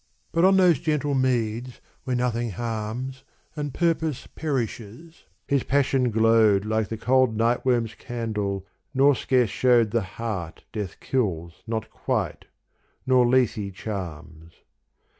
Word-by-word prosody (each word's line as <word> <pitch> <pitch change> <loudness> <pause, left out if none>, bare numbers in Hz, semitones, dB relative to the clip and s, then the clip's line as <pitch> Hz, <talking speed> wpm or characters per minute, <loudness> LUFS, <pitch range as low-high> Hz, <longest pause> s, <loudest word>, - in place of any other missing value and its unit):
But 165 +2 +3
on 190 0 +5
those 180 -7 +5
gentle 150 -2 0
meads 125 -2 0 0.3
where 130 - -1
nothing 120 -1 0
harms 120 +4 -4 0.3
And 145 -2 -3
purpose 160 -3 0
perishes, 130 +1 -5 0.2
his 140 -1 +2
passion 135 -2 +2
glowed 110 -2 +4
Like 110 -1 0
the 110 - -5
cold 125 -1 +2
nightworm's 120 0 +1
candle 105 -5 -3 0.3
nor 140 +2 +5
scarce 125 -2 +1
shewed 120 -4 +3
The 115 - +1 0.2
heart 100 -8 -4
death 105 -4 -5
kills 85 -10 -2
not 110 -1 -3
quite - - -2 0.6
nor 130 -2 +4
Lethe 110 -6 +1
charms. 85 -6 -7
120 Hz, 120 wpm, -25 LUFS, 105-130 Hz, 0.6 s, on